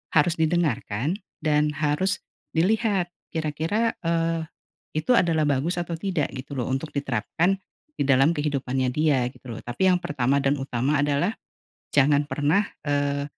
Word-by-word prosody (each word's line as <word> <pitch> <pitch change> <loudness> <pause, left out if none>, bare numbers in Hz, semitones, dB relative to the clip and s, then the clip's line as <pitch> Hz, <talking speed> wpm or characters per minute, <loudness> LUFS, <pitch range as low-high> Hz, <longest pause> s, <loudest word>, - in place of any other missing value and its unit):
harus 165 +2 +4
didengarkan 155 - 0 0.2
dan 150 -1 +3
harus 155 +6 0 0.3
dilihat 195 0 +2 0.2
kira-kira, 160 +9 0 0.2
eee, 165 -1 0 0.5
itu 155 +11 +1
adalah 165 -7 +3
bagus 145 +4 +1
atau 170 -1 -4
tidak 180 -7 -1
gitu 135 +2 -7
loh 125 -3 -2
untuk 145 +3 -3
diterapkan 140 - 0 0.4
di - - +3
dalam 135 +4 +5
kehidupannya 135 -4 -1
dia 140 -3 +2
gitu - - -22
loh 115 - -6
tapi 120 +11 0
yang 180 - +3
pertama 140 -3 +1
dan 140 +1 +2
utama 135 +3 0
adalah, 145 +9 +1 0.6
jangan 145 +1 +4
pernah, 155 +8 +1 0.2
eee, 145 -1 0
150 Hz, 140 wpm, -25 LUFS, 140-170 Hz, 0.6 s, dalam